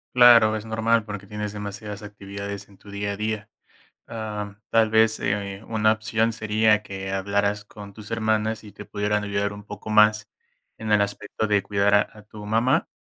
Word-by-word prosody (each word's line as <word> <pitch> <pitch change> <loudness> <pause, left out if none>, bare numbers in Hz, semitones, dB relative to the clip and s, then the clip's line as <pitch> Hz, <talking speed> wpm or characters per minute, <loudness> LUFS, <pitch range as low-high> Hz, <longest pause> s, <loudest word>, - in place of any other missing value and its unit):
Claro, 115 -3 +7
es 110 - -4
normal 110 0 +1
porque, 105 -2 -7
tienes 105 -1 -4
demasiadas 105 0 -6
actividades 100 -1 -7
en 100 - -19
tu 100 - -16
día 100 0 -3
a 100 - -5
día. 105 0 -3 0.6
Ah, 105 -3 -6
tal 110 -1 +3
vez, 110 0 +4
eh, 100 0 -2
una 110 -1 +3
opción 110 +1 0
sería 110 0 +2
que 95 -1 -6
hablaras 100 +1 0
con 100 -1 -12
tus 105 0 -11
hermanas 110 -1 0
y 105 - -11
te 105 - -11
pudieran 105 0 -1
ayudar 100 0 -1
un 105 0 -10
poco 105 +1 -9
más 105 0 +4 0.5
en 110 -1 -4
el 105 -1 +5
aspecto 105 +2 -2
de 100 -2 +2
cuidar 100 0 +2
a 105 - +3
a 105 - -13
tu 105 0 -11
mamá, 120 +9 +2
105 Hz, 185 wpm, -24 LUFS, 100-110 Hz, 0.6 s, Claro